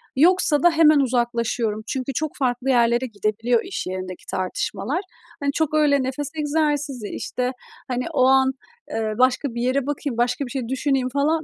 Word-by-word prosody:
Yoksa 310 -1 +4
da 345 - +7
hemen 310 -2 +5
uzaklaşıyorum. 235 -4 0
Çünkü 265 +1 -3
çok 310 +3 -2
farklı 255 -1 -1
yerlere 240 0 +3
gidebiliyor 225 +1 0
iş 380 - -5
yerindeki 185 -1 -6
tartışmalar. 195 - -2 0.4
Hani, 280 -1 0
çok 310 +1 -1
öyle 290 -3 +3
nefes 265 +2 -3
egzersizi, 295 -5 -1
işte, 250 0 -3 0.4
hani, 250 0 -2
o 270 - +3
an, 265 0 +5 0.4
eee, 220 -1 -1
başka 255 0 +2
bir 235 - -2
yere 255 +2 +1
bakayım, 285 -4 -3
başka 250 +3 0
bir 245 - -9
şey 255 -3 -3
düşüneyim, 265 -1 0
falan 300 +4 +1
260 Hz, 165 wpm, -23 LUFS, 235-290 Hz, 0.4 s, da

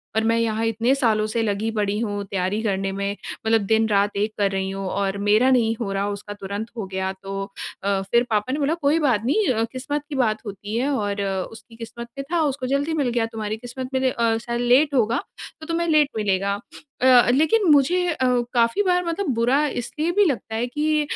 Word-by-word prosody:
और 220 - +2
मैं 230 +1 +2
यहाँ 225 -1 0
इतने 225 +3 +1
सालों 220 -6 +2
से 230 +2 -1
लगी 210 +1 -1
पड़ी 205 -2 -1
हूँ 205 -3 -2
तैयारी 195 +2 -2
करने 195 -2 -1
में, 200 +1 -3 0.3
मतलब 225 -1 +3
दिन-रात 210 -2 +2
एक 210 +1 0
कर 200 -1 +1
रही 190 0 -2
हूँ 195 0 -4
और 200 0 -1
मेरा 220 +5 +5
नहीं 230 -3 +3
हो 200 - -2
रहा, 195 +1 -1
उसका 205 0 -6
तुरंत 205 +2 -5
हो 220 - -3
गया। 190 0 -1
तो 195 0 -4 0.4
अ, 200 -1 +1
फिर 235 +1 +4
पापा 215 +2 0
ने 295 - -1
बोला 295 +2 +1
कोई 295 +3 +3
बात 245 -8 +1
नहीं 380 - +2
अ, 225 -1 0
किस्मत 280 +3 -3
की 295 - -4
बात 220 -5 +1
होती 205 +1 -6
है 260 +4 0
और 205 -7 -1 0.3
उसकी 225 +1 -14
किस्मत 230 +1 -8
में 275 - -3
था, 345 - +2
उसको 270 -3 -2
जल्दी 285 +4 0
मिल 285 -5 0
गया, 235 -1 0
तुम्हारी 220 -1 -4
किस्मत 250 +2 -7
में 260 - +2
ले 260 - +3
अ, 230 -1 +1
शायद 235 +1 -3
लेट 270 +5 +4
होगा 235 - +2 0.4
तो - - -7
तुम्हें 335 +1 -1
लेट 305 -3 +4
मिलेगा। 200 -1 0 0.4
अ, 250 -2 +6
लेकिन 320 - +3
मुझे 325 +6 +4
अ, 305 -6 0 0.3
काफ़ी 235 - +2
बार 360 -2 +2
मतलब 340 +3 -2
बुरा 250 +6 +2
इसलिए 300 +6 -2
भी 410 +3 +4
लगता 240 -7 -2
है 240 +2 -1
कि 300 +3 0
230 Hz, 215 wpm, -23 LUFS, 205-275 Hz, 0.4 s, अ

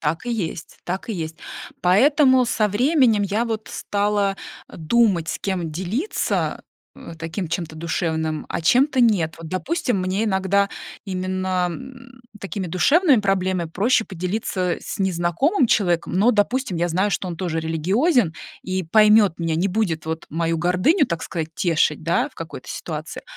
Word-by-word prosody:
Так 160 +8 -2
и 240 - -1
есть, 180 -7 -5
так 185 +5 -4
и - - -1
есть. 160 -3 -5 0.4
Поэтому 260 - +4
со 215 -3 +1
временем 245 -1 +3
я 205 +4 0
вот 225 -2 -4
стала, 205 -1 0 0.3
а, - - -12
думать, 180 -1 +2
с - - -3
кем 180 -4 -3
делиться, 190 - -2 0.3
э, - - -10
э, - - -9
таким 165 +4 -4
чем-то 165 -2 -4
душевным, 160 -1 -2
а - - -3
чем-то 260 - +3
нет. 185 -10 +2
Вот 165 -1 -8
допустим, 250 - -1
мне 185 +4 -1
иногда 200 0 +1 0.4
именно, 185 -1 -1
м, 255 +3 -11 0.2
такими 195 -1 -4
душевными 280 - +4
проблемами 185 -4 0
проще 225 +6 +2
поделиться, 185 -1 -2
э, - - -13
с - - -6
незнакомым 190 - +1
человеком, 175 -5 +1
но, 210 +7 +4
допустим, 230 -1 0
я 170 +1 0
знаю, 185 +5 +1
что 185 - -2
он 170 - -5
тоже 165 -3 -2
религиозен 185 - +1 0.3
и 185 0 -2
поймёт 210 +1 +4
меня, 165 -2 -1
не 180 +5 +1
будет 180 -6 -1
вот 160 0 -4
мою 165 +1 -1
гордыню, 185 - +2
так 170 -2 -3
сказать, 160 -2 -4
тешить, 165 -1 +1
да, - - +1
в - - -27
какой-то - - -8
ситуации, - - -6
190 Hz, 160 wpm, -22 LUFS, 170-225 Hz, 0.4 s, Поэтому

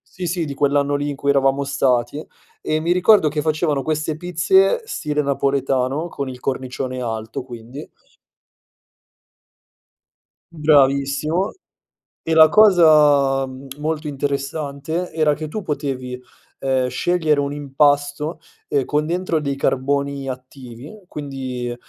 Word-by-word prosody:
sì, 180 -1 -4
sì, 170 0 -1
di 145 - -5
quell'anno 145 0 +1
lì 145 +1 -2
in 145 - -4
cui 140 - -2
eravamo 135 0 +2
stati 135 0 0 0.4
e 155 - -1
mi 170 +2 +1
ricordo 180 -1 +5
che 150 0 -1
facevano 155 -2 0
queste 155 0 -2
pizze 180 - +2
stile 150 - -2
napoletano, 140 +1 0
con 140 -5 -5
il 125 -1 -9
cornicione 130 -1 -4
alto 110 0 -4
quindi. 125 +3 -9 2.7
Bravissimo 150 +3 +2 0.7
e 160 - -1
la 160 -1 +8
cosa 150 -9 +5 0.3
molto 155 +1 -3
interessante 145 +3 -3
era 155 -2 +2
che 155 +2 -5
tu 210 +8 -5
potevi, 135 -5 -4 0.4
ehm, 130 -1 0
scegliere 155 +3 +1
un 140 0 -1
impasto, 145 +2 0 0.3
ehm, 140 -3 0
con 150 0 0
dentro 170 0 -1
dei 140 -2 -2
carboni 140 0 -1
attivi, 130 - -10
quindi 130 -5 -5
145 Hz, 120 wpm, -20 LUFS, 135-155 Hz, 2.7 s, la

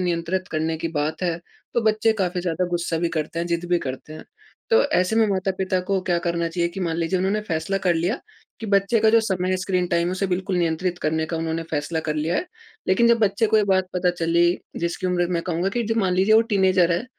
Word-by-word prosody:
नियंत्रित 180 +1 -1
करने 160 +1 -1
की 165 - -2
बात 155 +1 -2
है 170 -2 0 0.4
तो 235 - +3
बच्चे 220 +1 +3
काफ़ी 180 -1 0
ज़्यादा 175 0 -1
गुस्सा 170 -1 -1
भी 170 +1 0
करते 160 0 -3
हैं, 170 - -1
ज़िद 170 0 -1
भी 175 - +4
करते 135 +1 -6
हैं। 155 - -10 0.5
तो 460 +2 +5
ऐसे 185 +5 +1
में 225 -1 +4
माता-पिता 190 -1 -1
को 195 -1 +1
क्या 175 -2 +1
करना 170 0 0
चाहिए 170 0 -1
कि 195 - -5
मान 165 -2 -1
लीजिए 170 +2 0
उन्होंने 195 +3 0
फ़ैसला 165 +4 -1
कर 175 - +4
लिया 175 +9 0 0.4
कि 225 - -5
बच्चे 200 +2 +2
का 220 - +5
जो 230 +1 +5
समय 185 -4 -1
है 185 - +2
स्क्रीन 185 -1 -1
टाइम 170 0 +1
है 180 - -2
उसे 195 +1 -1
बिल्कुल 185 0 -1
नियंत्रित 175 +1 0
करने 160 +1 0
का 165 - -3
उन्होंने 165 0 -2
फ़ैसला 160 +2 -2
कर 150 - -1
लिया 155 +3 0
है। - - -2 0.4
लेकिन 235 +5 +4
जब 235 0 +4
बच्चे 210 +1 +2
को 220 - +2
ये 210 - +4
बात 190 -1 +1
पता 180 0 +1
चली 170 0 +2 0.3
जिसकी 170 +2 -2
उम्र 175 -1 +1
मैं 170 -1 0
कहूँगा 175 +1 -1
कि 240 +4 -1
जो - - 0
मान 185 -3 +1
लीजिए 195 +4 +4
वो 220 - +7
टीनेजर 185 -3 +3
है। 175 +6 -1
180 Hz, 245 wpm, -23 LUFS, 170-195 Hz, 0.5 s, वो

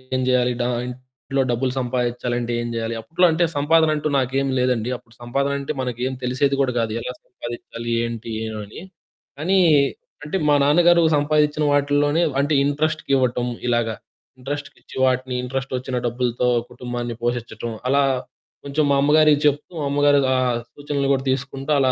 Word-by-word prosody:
ఏం 130 - +1
జెయ్యాలి, 125 -1 +2
డా 120 - +1 0.2
ఇంట్లో 130 +2 -4
డబ్బులు 125 +2 0
సంపాదిచ్చాలంటే 120 -1 -2
ఏం 120 - -3
జెయ్యాలి. 115 0 -2
అప్పట్లో 170 +8 +2
అంటే, 165 +2 +1
సంపాదనంటూ 155 0 +3
నాకేమి 135 +1 0
లేదండి. 125 -2 +1
అప్పుడు 115 -1 -23
సంపాదనంటే 140 +4 -1
మనకేం 125 +1 -3
తెలిసేది 135 +3 +1
గూడా 130 -2 +1
గాదు, 115 -2 -1
ఎలా 125 - -5
సంపాదిచ్చాలి, 120 -1 -7
ఏంటి, 115 -1 -5
ఏవని. 105 +1 -7 0.6
కానీ 190 +5 +2 0.6
అంటే, 150 +6 -2
మా 145 - +5
నాన్నగారు 170 +3 +5 0.2
సంపాదిచ్చిన 150 +1 +2
వాటిల్లోనే 145 +2 +2 0.2
అంటే, 145 +2 0
ఇంట్రస్ట్‌కివ్వటం 140 -4 0 0.2
ఇలాగ. 120 -1 +2 0.5
ఇంట్రస్ట్‌కిచ్చి 145 +2 -7
వాటిని, 130 0 0
ఇంట్రస్టొచ్చిన 130 0 -3
డబ్బులుతో 120 0 0 0.2
కుటుంబాన్ని 120 -1 -5
పోషిచ్చటం, 120 -1 -3 0.2
అలా 140 +1 +4 0.6
కొంచుం 145 +2 0
మా - - +4
అమ్మగారికి 150 0 +5
చెప్తూ, 145 +2 +1
మా - - -2
అమ్మగారు 145 0 +4 0.2
ఆహ్, 125 -2 +1 0.2
సూచనలు 145 -1 -2
గూడా 135 -1 +1
తీసుకుంటా 135 +2 -3
అలా 130 -1 +3
130 Hz, 135 wpm, -22 LUFS, 120-145 Hz, 0.6 s, మా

